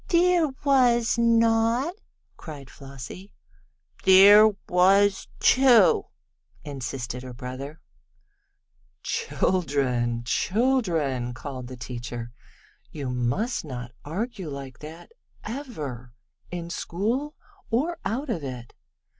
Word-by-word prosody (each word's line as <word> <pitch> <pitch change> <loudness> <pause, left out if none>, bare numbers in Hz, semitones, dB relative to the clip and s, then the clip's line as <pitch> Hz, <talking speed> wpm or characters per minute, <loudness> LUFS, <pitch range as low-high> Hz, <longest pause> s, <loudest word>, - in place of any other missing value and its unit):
"There 350 -1 +3 0.2
was 245 -5 +3
not!" 230 +5 +3 0.4
cried 140 -4 -10
Flossie. 140 +8 -10 0.7
"There 200 +3 +8 0.2
was 195 +2 +3
too!" 245 -6 +5 0.6
insisted 125 -3 -5
her 125 -1 -9
brother. 130 +5 -7 1.2
"Children 140 - 0
children!" 165 - 0
called 130 -2 -7
the 130 0 -9
teacher. 120 0 -6 0.6
"You 140 -4 -5
must 125 - -1
not 125 -5 -7
argue 195 - -4
like 140 -2 -8
that 160 - -11 0.3
ever 150 - -7 0.3
in 170 -1 -6
school, 235 - -2 0.3
or 295 +10 0
out 255 +5 -2
of 165 -9 -3
it. 125 -3 -7
170 Hz, 90 wpm, -25 LUFS, -, 1.2 s, There